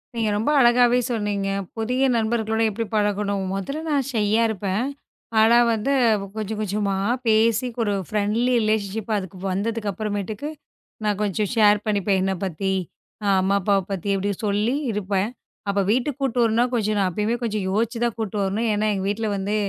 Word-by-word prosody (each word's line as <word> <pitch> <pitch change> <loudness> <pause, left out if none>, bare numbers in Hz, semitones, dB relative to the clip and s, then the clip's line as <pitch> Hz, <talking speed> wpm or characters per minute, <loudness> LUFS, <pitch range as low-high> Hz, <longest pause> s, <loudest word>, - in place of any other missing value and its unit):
நீங்க 225 -2 0
ரொம்ப 220 +7 0
அழகாவே 245 0 +5
சொன்னீங்க. 205 -4 -1 0.3
புதிய 250 +4 +1
நண்பர்களுடன் 220 -1 +1
எப்படி 225 +3 -3
பழகணும்? 205 -1 0
முதல்ல 275 +11 -4
நான் 280 -4 +1
ஷையா 215 0 +2
இருப்பேன். 205 +1 -1 0.5
ஆனா 225 +2 +6 0.2
வந்து 225 +5 -1 0.5
கொஞ்சம் 215 0 -3
கொஞ்சமா 205 -1 -1 0.3
பேசிப் 230 +2 +2
ஒரு 205 -2 0
ஃப்ரெண்ட்லி 215 +4 +1
ரெலேஷன்ஷிப் 215 0 -1
அதுக்கு 190 -1 -6
வந்ததுக்கு 210 +2 -2
அப்புறமேட்டுக்கு 210 +6 -4 0.5
நான் 210 -1 0
கொஞ்சம் 205 0 0
ஷேர் 210 -2 +5
பண்ணிப்பேன். 200 -2 +1
என்ன 190 +1 +1
பத்தி, 190 +1 -2 0.5
அ, - - -1
அம்மா 195 +1 +2
அப்பாவ 195 0 +2
பத்தி 195 +1 -1
சொல்லி 210 +5 +1 0.2
இருப்பேன். 200 0 -1 0.4
அப்ப 200 0 +1
வீட்டுக்குக் 255 +4 0
கூட்டிட்டு 250 -2 +2
வரணும். 230 +2 +2
கொஞ்சம் 215 -3 0
நான் 190 - +2
எப்பவுமே 215 +6 -1
கொஞ்சம் 215 -4 -1
யோசிச்சுதான் 230 +3 0
கூட்டிட்டு 210 -2 -2
வரணும். 205 +4 -1
ஏன்னா 210 +1 0
எங்க 190 - -3
வீட்ல 220 +2 -1
வந்து 200 +2 -2
210 Hz, 150 wpm, -23 LUFS, 200-230 Hz, 0.5 s, ஆனா